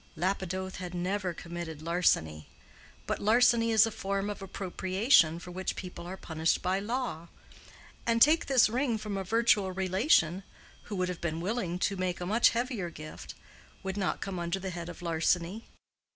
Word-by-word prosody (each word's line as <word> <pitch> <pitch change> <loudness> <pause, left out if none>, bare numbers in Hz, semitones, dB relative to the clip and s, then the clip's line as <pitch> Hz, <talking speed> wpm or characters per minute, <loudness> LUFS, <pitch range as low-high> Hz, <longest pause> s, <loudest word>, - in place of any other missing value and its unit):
Lapidoth 190 +1 -2
had 180 -1 -6
never 185 +1 -1
committed 170 -2 -7
larceny; 80 - +1 0.6
but - - -2
larceny 230 +1 +4
is 220 -1 +6
a 225 - -3
form 200 0 -2
of 205 - -8
appropriation 190 - +2
for 180 +1 -9
which 185 +1 -3
people 180 -1 -7
are 190 +2 -6
punished 160 -2 0
by 185 +2 +1
law; 210 -6 -3 0.8
and, 230 0 +3
take 310 +7 +5
this 265 -4 +5
ring 240 +1 0
from 210 -2 -5
a 195 - -2
virtual 210 -2 +2
relation, 185 - +2 0.4
who 210 - -5
would 185 -1 0
have 180 - -5
been 165 -1 -2
willing 185 -1 -2
to 195 +2 0
make 185 -1 -2
a 175 - -4
much 220 +6 +4
heavier 235 -6 -2
gift, 155 -1 -9 0.5
would 190 0 -3
not 195 -3 -1
come 190 -2 -4
under 170 +2 -1
the 190 0 -4
head 170 -1 -6
of 175 0 -10
larceny. 170 +5 0
190 Hz, 170 wpm, -30 LUFS, 175-210 Hz, 0.8 s, is